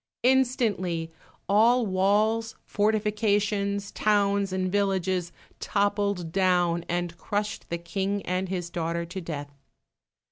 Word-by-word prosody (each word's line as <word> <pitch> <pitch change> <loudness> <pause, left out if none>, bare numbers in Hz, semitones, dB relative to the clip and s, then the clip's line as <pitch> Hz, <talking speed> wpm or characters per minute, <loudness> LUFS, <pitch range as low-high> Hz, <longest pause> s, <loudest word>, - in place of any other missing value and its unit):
Instantly 225 -10 +1 0.4
all 230 +4 +4
walls, 210 +4 +1
fortifications, 205 -1 0
towns, 200 -2 +1
and 185 -1 -1
villages, 190 -3 0 0.3
toppled 200 -4 0
down, 175 -2 +2
and 175 -1 -2
crushed 210 0 -3
the 170 - -1
King 195 +4 -2
and 185 +1 -2
his 175 -2 -3
daughter 170 0 -2
to 185 +3 -6
death. 145 -4 -6
195 Hz, 105 wpm, -27 LUFS, 175-210 Hz, 0.4 s, all